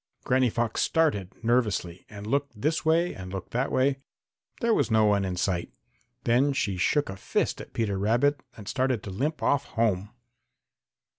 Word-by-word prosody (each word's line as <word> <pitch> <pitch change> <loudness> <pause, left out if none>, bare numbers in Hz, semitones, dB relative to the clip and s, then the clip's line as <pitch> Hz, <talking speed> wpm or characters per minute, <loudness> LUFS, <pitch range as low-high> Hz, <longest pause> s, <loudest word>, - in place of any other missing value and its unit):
Granny 130 -1 +3
Fox 115 0 -1
started 105 - +1
nervously 105 -7 0
and 105 -1 -9
looked 140 -1 -1
this 155 +7 0
way 165 +2 +2
and 90 -1 -8
looked 95 -2 -6
that 125 +4 -1
way. 135 +1 +2 0.6
There 235 -2 +2
was - - +2
no 110 -1 +4
one 100 -1 +3
in 95 -1 -2
sight. 90 -1 -1 0.5
Then 130 +4 +3
she 100 -7 -1
shook 145 - +1
a 95 - -5
fist 95 - -1
at - - -11
Peter 100 -4 -1
Rabbit 120 +8 +2 0.2
and 105 -3 -10
started 130 -3 0
to 100 - -6
limp 145 +11 -2
off 140 0 +2
home. 105 -4 0
115 Hz, 170 wpm, -27 LUFS, 100-140 Hz, 0.6 s, no